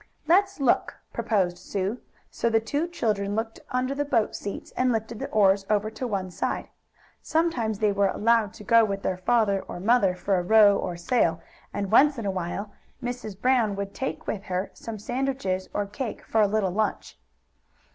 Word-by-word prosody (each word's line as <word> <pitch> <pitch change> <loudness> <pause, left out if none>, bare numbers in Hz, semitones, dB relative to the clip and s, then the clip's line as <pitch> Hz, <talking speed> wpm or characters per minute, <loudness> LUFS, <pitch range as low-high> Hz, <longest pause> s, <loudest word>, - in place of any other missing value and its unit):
"Let's 390 +2 +3
look," 270 -4 +2 0.2
proposed 180 -5 0
Sue, 195 +5 -3 0.3
so 235 - 0
the 225 -1 +3
two 290 +9 -2
children 205 - -1
looked 225 +1 -3
under 255 +2 0
the 285 +1 -1
boat 245 -7 +1
seats 200 - -6
and 255 0 +2
lifted 225 0 -3
the - - -3
oars 195 -2 +4
over 215 0 +1
to 250 +3 -4
one 190 -4 -3
side. - - -3 0.5
Sometimes 260 -10 0
they 210 0 +2
were 200 0 +2
allowed 220 +1 +2
to - - -11
go 230 +3 +5
with 195 -2 -2
their 185 - -1
father 200 0 +2
or 175 - -6
mother 200 -2 +3
for 190 +1 0
a - - -2
row 205 +1 +6
or 175 -3 -3
sail, 170 -3 +1 0.3
and, 200 -1 -3
once 280 +4 +5
in 230 - -4
a 195 - +1
while, 190 +3 -4 0.3
Mrs. 245 -5 -5
Brown 245 -5 +2
would 200 0 -4
take 265 - -4
with 200 -1 -4
her 185 +1 -2
some 225 -1 -7
sandwiches 240 -5 -2
or 205 - -1
cake 210 +4 -5
for 220 - +2
a 210 - +5
little 200 -2 0
lunch. 215 +3 -2
215 Hz, 185 wpm, -26 LUFS, 195-240 Hz, 0.5 s, row